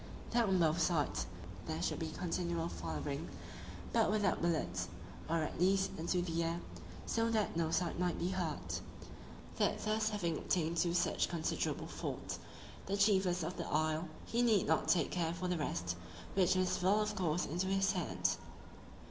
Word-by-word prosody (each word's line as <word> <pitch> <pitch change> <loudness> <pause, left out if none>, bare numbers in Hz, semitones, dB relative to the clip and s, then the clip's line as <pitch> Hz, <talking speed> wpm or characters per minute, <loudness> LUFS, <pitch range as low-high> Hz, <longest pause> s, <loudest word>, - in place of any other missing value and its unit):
That 235 -1 +3
on 190 - +4
both 165 -1 +3
sides 160 -3 +1 0.4
there 160 0 -2
should 175 - -1
be 160 - -2
continual 170 0 -1
firing, 80 - -4 0.6
but - - +4
without 205 -2 +2
bullets, 90 - 0 0.4
or 165 -1 +2
at 155 - -4
least 190 +1 +3
into 175 +2 +1
the 170 -1 0
air, 165 +1 -1 0.5
so 230 0 +1
that 220 -5 +1
no 165 -1 +1
side 170 +1 0
might 180 -2 +1
be 175 - 0
hurt. 180 -5 -2 0.8
That - - +3
thus 215 0 +2
having 175 -7 -1
obtained 170 -1 0
two 170 +1 +2
such 180 - +2
considerable 165 -2 -1
forts, - - -4 0.5
the 200 +1 0
chiefest 190 -4 +3
of 175 +3 -3
the - - -3
isle, 155 +2 +1 0.2
he 235 - 0
need 225 -5 +4
not - - +2
take 175 - +3
care 170 -2 0
for 180 +1 -2
the 180 -1 0
rest, 90 - -1 0.4
which 185 -1 +4
must 185 0 +2
fall 190 +4 +4
of 210 0 0
course 175 -1 +1
into 175 +5 -1
his 195 0 +3
hands. 180 -4 0
175 Hz, 170 wpm, -35 LUFS, 165-190 Hz, 0.8 s, on